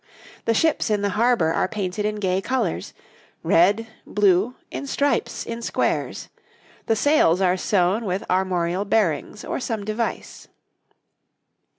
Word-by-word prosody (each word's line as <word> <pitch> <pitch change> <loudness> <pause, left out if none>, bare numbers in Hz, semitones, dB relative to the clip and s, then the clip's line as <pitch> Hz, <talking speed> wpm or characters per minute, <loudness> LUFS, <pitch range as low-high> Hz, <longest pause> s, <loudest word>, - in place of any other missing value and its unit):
The 230 - +2
ships 315 -2 +2
in 205 -1 0
the 200 - +1
harbour 220 -6 +2
are - - +1
painted 205 -1 -3
in 210 0 -1
gay 190 -2 0
colours 235 -7 -2 0.5
red, 200 +7 +3 0.2
blue, 205 +3 +2 0.2
in 280 - -5
stripes, 275 -3 0
in 230 0 -5
squares; - - -1 0.6
the 225 - +3
sails 220 - +3
are 185 -1 +3
sewn 190 +3 +1
with 185 0 -2
armorial 185 0 0
bearings 205 -2 0
or - - -3
some 225 -5 -3
device. 215 +2 -4
205 Hz, 130 wpm, -23 LUFS, 185-230 Hz, 0.6 s, red